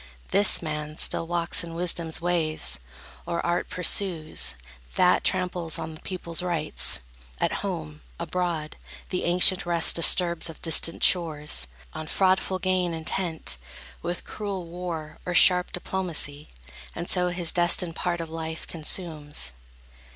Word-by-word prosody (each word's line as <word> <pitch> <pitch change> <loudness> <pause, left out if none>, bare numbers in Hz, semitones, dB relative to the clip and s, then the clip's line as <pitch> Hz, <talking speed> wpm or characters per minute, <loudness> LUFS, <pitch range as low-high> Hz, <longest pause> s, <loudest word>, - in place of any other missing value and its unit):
This 200 -3 +2
man 150 -1 -5
still 165 - +4
walks 170 +2 +3
in 165 -1 -8
wisdom's 170 -2 -1
ways, 155 - 0 0.5
or 170 - -2
art 175 0 -1
Pursues; 180 - +3 0.4
that - - +3
tramples 175 -3 -1
on 160 0 -6
the 155 - -12
people's 175 -2 -1
rights, 165 - 0 0.4
At - - 0
home, 75 -1 -6 0.2
abroad; 170 -4 -3 0.3
the 180 - -2
ancient 180 +2 +5
rest 170 -1 +5
disturbs 170 0 +4
Of 165 - -11
distant 165 0 +1
shores, 155 -4 +2 0.3
on 155 0 -7
fraudful 190 +1 +1
gain 185 -2 -1
intent, 160 - -1 0.4
With 175 +1 -4
cruel 200 -4 -5
war, 170 -2 -7
or 180 - -4
sharp 180 0 +5
diplomacy; 170 -6 -2 0.5
And 170 - -5
so 180 -1 +1
his 175 -2 0
destined 175 -1 +1
part 175 -1 -2
of 165 - -5
life 160 0 -6
consumes. 150 - -4
170 Hz, 130 wpm, -25 LUFS, 160-180 Hz, 0.5 s, ancient